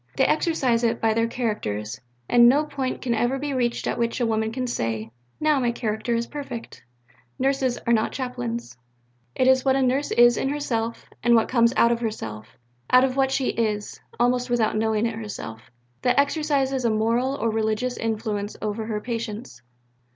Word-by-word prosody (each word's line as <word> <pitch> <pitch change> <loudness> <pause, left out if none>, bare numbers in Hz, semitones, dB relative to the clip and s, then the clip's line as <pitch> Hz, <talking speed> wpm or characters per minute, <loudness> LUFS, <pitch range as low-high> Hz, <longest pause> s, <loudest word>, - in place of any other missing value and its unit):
They - - +4
exercise 270 -7 +1
it 230 - +1
by 225 -1 +2
their 230 +1 +1
characters, 110 - -3 0.3
and 240 0 +7
no 285 +4 +4
point 270 -3 -4
can 245 -2 0
ever 240 +4 +1
be 285 +1 -3
reached 240 -2 -1
at - - -2
which 235 +1 0
a 240 - +2
woman 220 -1 0
can 255 +2 -3
say, 115 - -3 0.3
"Now 305 -2 +3
my 240 -2 +1
character 225 0 -2
is 230 0 0
perfect." 275 -4 -7 0.6
"Nurses 265 -2 +1
are 235 - +3
not 220 -1 +2
chaplains"; 120 - -4 0.6
"it 255 - +2
is 260 0 +5
what 265 -1 +3
a 270 - +2
nurse 265 +3 +1
is 240 0 +5
in 270 - 0
herself, 235 -6 -2 0.2
and 240 0 +4
what 225 - +3
comes 235 -2 +4
out 235 - +5
of 235 - 0
herself, 115 - -5 0.3
out 255 0 +6
of 260 -1 +1
what 270 -1 +2
she 265 -1 0
is 210 -2 -2 0.2
(almost 245 +1 +2
without 230 -3 +1
knowing 220 0 +1
it 230 - -1
herself) 165 - -7 0.3
that 250 - +2
exercises 280 -3 +1
a 235 - +3
moral 230 +5 +1
or 230 -5 -1
religious 220 +3 -1
influence 215 -2 -3
over 215 +1 -3
her 210 -2 -2
patients. 225 - -5
235 Hz, 185 wpm, -24 LUFS, 220-260 Hz, 0.6 s, and